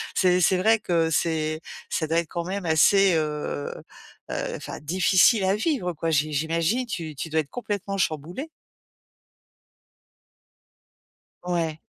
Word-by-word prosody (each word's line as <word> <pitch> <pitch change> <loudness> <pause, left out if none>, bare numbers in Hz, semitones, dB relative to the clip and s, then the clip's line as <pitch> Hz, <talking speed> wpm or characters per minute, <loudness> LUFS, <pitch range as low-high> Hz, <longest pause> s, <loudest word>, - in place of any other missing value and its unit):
c'est 180 -1 +3
c'est 185 +1 +4
vrai 220 +4 +3
que 165 -5 +1
c'est 155 -1 0 0.3
ça 160 - -1
doit 165 +2 +1
être 170 - -3
quand 170 -1 -4
même 190 0 -4
assez, 190 +4 +5
heu 150 - -2 0.6
heu, - - -3
enfin - - -7
difficile 185 +6 +3
à 190 +1 +2
vivre 220 - -1
quoi. 165 +1 -3
J'i 155 0 +1
j'imagine 165 - 0
tu 165 -7 -5
tu 160 - -5
dois 160 0 +2
être 145 - -12
complètement 205 -4 -4
chamboulée. 175 - -2 2.9
Ouais. 165 -3 -2
170 Hz, 135 wpm, -25 LUFS, 155-195 Hz, 2.9 s, assez